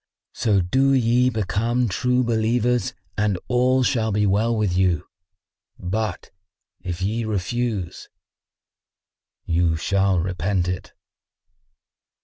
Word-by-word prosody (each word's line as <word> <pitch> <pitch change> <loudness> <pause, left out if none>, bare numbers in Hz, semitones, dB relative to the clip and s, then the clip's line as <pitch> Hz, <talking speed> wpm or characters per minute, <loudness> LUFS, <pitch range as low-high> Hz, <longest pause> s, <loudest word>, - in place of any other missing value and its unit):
So 105 -5 +2
do 135 +10 +2
ye 125 0 +3
become 115 +2 0
True 125 +6 +1
Believers 120 +1 0 0.2
and 105 -3 +1
all 130 +1 +2
shall 115 -3 +1
be 105 +1 +1
well 110 +4 +1
with 100 -4 0
you; 90 -4 +1 0.7
but, 100 +1 -3 0.5
if 90 0 -5
ye 110 +4 -1
refuse, 110 -1 -3 1.4
you 85 -1 +1
shall 95 +3 +1
repent 90 +1 -1
it." 90 0 -5
105 Hz, 105 wpm, -22 LUFS, 95-120 Hz, 1.4 s, ye